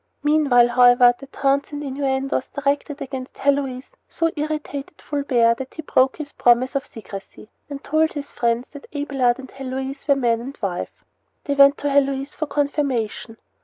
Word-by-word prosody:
Meanwhile, 285 -5 +4
however, 245 0 +6
the 275 - -11
taunts 275 +1 0
and 290 0 -5
innuendos 270 -1 -1
directed 285 +1 -2
against 260 -1 -7
Heloise 275 -2 -1 0.2
so 330 -1 0
irritated 300 -1 -4
Fulbert 245 -5 +1
that 265 0 -7
he 315 - -6
broke 265 -2 +2
his 300 -2 -7
promise 245 +2 +3
of 275 -1 -2
secrecy, 210 -1 -10 0.2
and 280 -1 -7
told 315 +1 +1
his 285 -1 -6
friends 235 +1 0
that 285 - -11
Abelard 270 -4 +1
and 265 -1 -11
Heloise 265 +1 -6
were 280 - +5
man 235 -4 +1
and 270 +4 -8
wife. 185 -4 -5 0.4
They 285 - -1
went 280 0 +6
to 290 - -2
Heloise 275 0 +1
for 310 - -4
confirmation. 280 -6 -2
275 Hz, 165 wpm, -22 LUFS, 250-285 Hz, 0.4 s, however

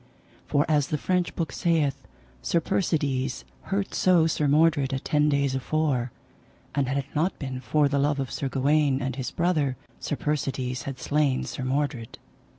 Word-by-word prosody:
For, 145 0 +2
as 150 -3 +2
the 150 - -1
French 180 +3 0
book 165 -3 -2
saith, 150 -6 0 0.3
Sir 170 - +1
Persides 145 -8 -1 0.2
hurt 195 0 -2
so 180 -3 +4
Sir 155 -2 +1
Mordred 145 -2 +3
a - - +1
ten 150 +1 +2
days 140 -2 +1
afore; 135 -2 0 0.6
and 140 -2 +1
had 135 +2 -1
it 140 - -1
not 165 +6 +1
been 130 -3 -5
for 145 +5 +2
the 140 0 0
love 145 0 +1
of 135 -2 -3
Sir 135 - -2
Gawaine 140 +1 +2
and 130 -2 -3
his 130 -2 -3
brother, 155 -7 0 0.2
Sir 150 - -2
Persides 135 -4 -2
had 135 -2 -5
slain 145 -3 +1
Sir 130 - -5
Mordred. 130 -3 -2
145 Hz, 170 wpm, -26 LUFS, 135-155 Hz, 0.6 s, so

